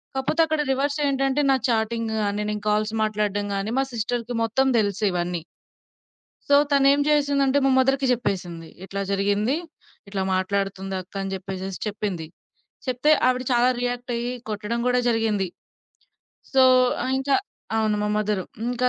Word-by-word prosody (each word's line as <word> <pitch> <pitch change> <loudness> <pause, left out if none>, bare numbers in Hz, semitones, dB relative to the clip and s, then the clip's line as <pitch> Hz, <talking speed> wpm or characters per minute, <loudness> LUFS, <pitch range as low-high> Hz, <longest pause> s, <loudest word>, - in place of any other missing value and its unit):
కాపోతే 265 +5 +1
అక్కడ 315 -1 0
రివర్స్ 280 +2 0
ఏంటంటే 275 +1 +1
నా - - +5
చాటింగ్ 225 0 0
గాని 205 0 -1
నేను 210 -1 -4
కాల్స్ 215 +1 +1
మాట్లాడడం 205 -1 -1
గాని 200 +3 -2
మా - - +3
సిస్టర్‌కి 235 +1 -2
మొత్తం 265 +4 +1
తెలుసు 205 0 -1
ఇవన్నీ. 175 -1 -2 1.1
సో, 285 - +6 0.2
తనేం 280 0 +5
జేసిందంటే, 285 -2 +2
మా - - +4
మదర్‌కి 270 +1 +2
జెప్పేసింది 175 -8 -2 0.2
"ఇట్లా 200 +1 -4
జరిగింది. 205 +5 +1 0.5
ఇట్లా 195 -1 -2
మాట్లాడుతుంది, 195 0 -2
అక్క" 180 - -19
అని 195 0 -4
జెప్పేసేసి 190 0 -6
చెప్పింది. 200 -5 -3 0.6
చెప్తే 255 +4 +2 0.2
ఆవిడ 255 0 +1
చాలా 240 +1 +4
రియాక్ట్ 245 0 -3
అయ్యి 240 +1 -2 0.2
కొట్టడం 215 +2 -3
గూడా 250 0 +3
జరిగింది. 220 -4 +1 1.1
సో, 265 - +7 0.4
ఆహ్, 255 - -1
ఇంకా 270 +1 +1 0.4
అవును. 215 -1 +1
మా 210 - 0
మదరు 210 -2 0 0.2
ఇంక 245 0 -3
220 Hz, 145 wpm, -24 LUFS, 200-260 Hz, 1.1 s, సో